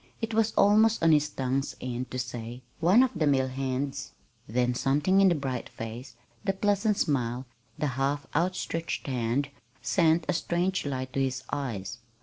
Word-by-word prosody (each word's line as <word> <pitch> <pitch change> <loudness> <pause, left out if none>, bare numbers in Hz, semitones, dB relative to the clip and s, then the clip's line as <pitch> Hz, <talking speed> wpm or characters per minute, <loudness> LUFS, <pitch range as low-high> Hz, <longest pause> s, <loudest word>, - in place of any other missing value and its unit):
It 225 -1 -3
was 225 0 +2
almost 215 0 +4
on 165 - +6
his 150 -1 +3
tongue's 135 0 -2
end 125 0 -4
to 130 - -5
say, 120 0 -5 0.2
"One 185 +9 +6
of 260 - +1
the 160 -2 +1
mill 130 -2 +2
hands"; 135 +1 -3 0.3
then 125 +2 +1
something 145 +10 +2
in 195 - +6
the 175 - +2
bright 135 -4 -3
face, 115 +2 -8 0.3
the 195 - +1
pleasant 205 +1 +1
smile, 125 -4 0 0.3
the - - -1
half 135 +1 -1
outstretched 165 0 -1
hand, 130 +1 -1 0.3
sent 165 -2 +2
a 185 - +1
strange 175 +1 0
light 130 -2 -4
to 135 - 0
his 130 -1 -1
eyes. 115 -6 -3
140 Hz, 165 wpm, -28 LUFS, 130-175 Hz, 0.3 s, on